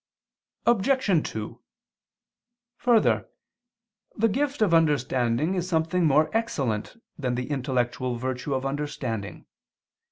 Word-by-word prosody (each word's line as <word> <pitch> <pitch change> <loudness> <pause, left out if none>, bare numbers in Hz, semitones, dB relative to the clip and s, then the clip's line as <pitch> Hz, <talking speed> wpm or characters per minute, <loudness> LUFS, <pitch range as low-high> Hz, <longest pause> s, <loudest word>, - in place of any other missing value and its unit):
Obj. 235 - +2
2: 110 -1 -6 1.2
Further, 240 -3 +3 0.9
the 225 +1 +3
gift 275 +2 0
of 190 -5 +2
understanding 145 -2 +2
is 180 -1 -2
something 165 +1 +1
more 155 +6 +3
excellent 145 - -1 0.2
than 125 -3 -1
the 125 +4 -4
intellectual 125 -2 -1
virtue 130 +3 -3
of 130 +1 -2
understanding. 130 - -4
145 Hz, 100 wpm, -26 LUFS, 125-190 Hz, 1.2 s, Further